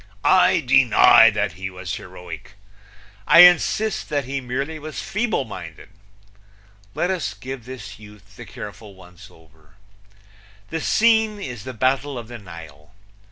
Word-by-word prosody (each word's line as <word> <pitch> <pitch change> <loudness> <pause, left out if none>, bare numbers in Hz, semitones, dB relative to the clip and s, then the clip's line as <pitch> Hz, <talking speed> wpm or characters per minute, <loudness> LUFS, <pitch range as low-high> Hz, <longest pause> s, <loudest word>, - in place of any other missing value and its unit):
I - - +4
deny - - +6
that - - -2
he 95 +3 -7
was 90 -1 -7
heroic. 90 0 -10 0.7
I 165 - +8
insist 180 +5 +3
that 145 -3 -2
he 135 +1 -4
merely 135 +5 -4
was 155 +1 -8
feeble 215 - -2
minded. 85 -7 -10 1.1
Let 180 - -1
us 185 -3 -3
give 130 -2 -9
this 110 -6 -10
youth 105 -1 -17
the - - -11
careful 105 0 -10
once 90 -1 -16
over: 80 -2 -24 0.9
The 160 0 -4
scene 220 -2 +2
is 120 - -8
the 130 -1 -7
Battle 130 +3 -1
of 115 -1 -9
the 120 -1 -9
Nile. 80 -4 -13
120 Hz, 140 wpm, -21 LUFS, 95-150 Hz, 1.1 s, I